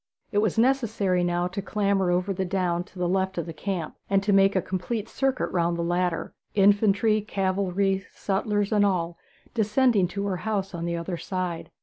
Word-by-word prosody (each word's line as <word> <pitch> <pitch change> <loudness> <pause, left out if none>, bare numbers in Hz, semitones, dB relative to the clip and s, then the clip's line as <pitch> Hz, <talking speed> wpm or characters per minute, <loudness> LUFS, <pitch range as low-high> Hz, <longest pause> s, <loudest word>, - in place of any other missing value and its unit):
It 205 - +2
was 215 -1 +1
necessary 225 -7 +2
now 175 0 0
to 190 +2 -4
clamber 200 -2 +1
over 180 +2 +1
the 190 - -2
down 180 -2 0
to 195 - -18
the 180 -1 0
left 190 +1 0
of 170 - -1
the 165 - -6
camp, 175 -1 -4
and 195 0 +1
make 195 0 +5
a - - +4
complete 205 +4 -3
circuit 270 +2 -1
round 170 -1 +1
the 170 - -1
latter 175 0 -1 0.2
infantry, 205 +2 +4
cavalry, 195 -1 0
sutlers, 205 +1 -1
and 210 -1 +4
all 175 -4 0 0.3
descending 220 -2 +3
to 200 +3 -4
her 190 -2 -1
house 200 -2 -2
on 170 -1 -4
the 170 0 -1
other 170 +1 -4
side. 180 -2 -4
195 Hz, 185 wpm, -26 LUFS, 180-205 Hz, 0.3 s, make